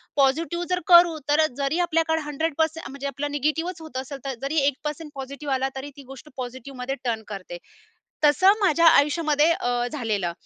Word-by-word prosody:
Positive 325 +6 +1
जर 360 0 +1
करू, 345 -2 +7
तर 305 +2 +4
जरी 280 +4 -1
आपल्याकडे 325 -2 +1
100% 315 +2 -2
म्हणजे 280 +1 -6
आपलं 280 +2 -4
निगेटिव्हच 320 +4 -2
होत 315 -5 -8
असेल, 270 +1 -6
तर 270 - -2
जरी 280 +4 -2
1% 300 +2 -3
पॉझिटिव्ह 275 +1 -5
आला, 265 0 0
तरी 270 +2 -6
ती 280 - -11
गोष्ट 270 +3 -11
पॉझिटिव्हमध्ये 255 +1 -5
टर्न 230 -3 -2
करते. 195 -4 -7 0.7
तसं 370 +8 +5
माझ्या 335 -4 +3
आयुष्यामध्ये 300 0 +4
अ, 245 -8 -1
झालेलं. 215 - -2
290 Hz, 160 wpm, -24 LUFS, 265-320 Hz, 0.7 s, करू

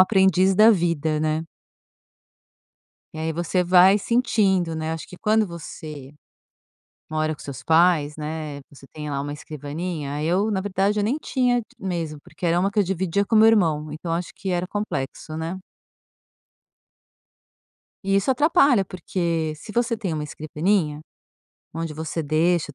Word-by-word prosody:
aprendiz 190 -1 +4
da 215 +3 +7
vida, 165 -5 +1
né. 155 +1 0 1.7
E - - -7
aí 160 0 -2
você 175 +2 0
vai 185 +2 +6
sentindo, 200 -7 +1
né, 160 0 -2
acho 165 - -6
que 180 - -11
quando 215 +2 +2
você 155 -4 -9 1.0
mora 155 0 0
com - - -29
seus 140 -4 -8
pais, 160 -3 +3
né, 155 -1 -5
você 135 -1 -15
tem 150 -1 -6
lá 140 - -2
uma 145 +1 -4
escrivaninha, 150 0 -5
eu, 190 +6 +1
na 190 - 0
verdade, 200 +1 0
eu 205 - +1
nem 250 +8 0
tinha 250 -5 0 0.2
mesmo, 165 -5 -3
porque 185 - -7
era 170 +1 +3
uma 195 - +2
que 200 - -12
eu 205 - +5
dividia 190 +1 0
com 225 - 0
meu 220 +1 +7
irmão, 160 -9 +2
então 165 +2 -4
acho 170 +1 -2
que 190 -1 -4
era 180 0 -1
complexo, 155 -7 -4
né. 165 +3 -4 2.5
E 195 - +1
isso 195 +6 +2
atrapalha, 275 - +4
porque 170 -3 -2
se 210 - -10
você 235 +1 +1
tem 195 -6 -3
uma 155 - -2
escrivaninha 155 +1 -1 0.7
onde 165 -1 -3
você 160 +2 -4
deixa 160 +3 +2
os - - -17
170 Hz, 155 wpm, -23 LUFS, 155-195 Hz, 2.5 s, da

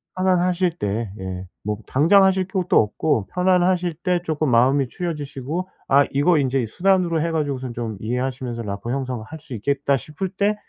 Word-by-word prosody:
편안하실 185 -1 +2
때 105 0 -2
예 95 -1 -5 0.2
뭐 105 0 -2
당장 180 +9 +5
하실 190 -1 +3
필요도 190 -2 -1
없고 110 +1 0
편안하실 180 -1 +2
때 180 -2 +2
쪼끔 155 -3 0
마음이 130 +3 +4
추려지시고 155 +1 -4 0.2
아 140 +1 +5
이거 150 +4 +3
인제 135 -2 +1
수단으로 175 - +1
해 170 - 0
가지고선 140 -6 -2
좀 115 -3 -4
이해하시면서 125 0 -3
'라포 100 +3 -4
형성할 130 +1 -4
수 150 -3 -11
있겠다.' 140 +5 0
싶을 155 +7 -4
때 200 +3 0
145 Hz, 360 characters per minute, -22 LUFS, 125-180 Hz, 0.2 s, 당장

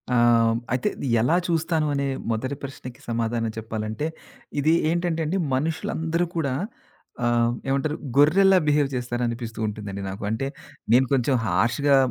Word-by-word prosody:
ఆహ్, 115 -1 +5 0.2
అయితే 125 - +1
ఇది - - -4
ఎలా 125 +9 +3
చూస్తాను 165 -2 +1
అనే 140 0 0 0.3
మొదటి 130 +5 -2
ప్రశ్నకి 130 -2 -8
సమాధానం 115 0 -1
చెప్పాలంటే, 110 +4 -3 0.5
ఇది 155 +3 +3 0.2
ఏంటంటే 170 -1 0
అండి 170 +6 0 0.2
మనుషులందరూ 160 +3 -1
కూడా 140 -5 0 0.7
ఆహ్, 120 0 +2
ఏమంటారు 140 +3 0 0.2
గొర్రెల్లా 185 +7 +6
బిహేవ్ 145 -2 +3
చేస్తారనిపిస్తూ 120 -2 -3
ఉంటుందండి 105 -2 -5
నాకు. 95 +3 -6
అంటే 110 +5 -1 0.4
నేను 125 +3 +6
కొంచెం 130 0 +2
హర్ష‌గా 115 +9 +2
130 Hz, 130 wpm, -24 LUFS, 115-150 Hz, 0.7 s, గొర్రెల్లా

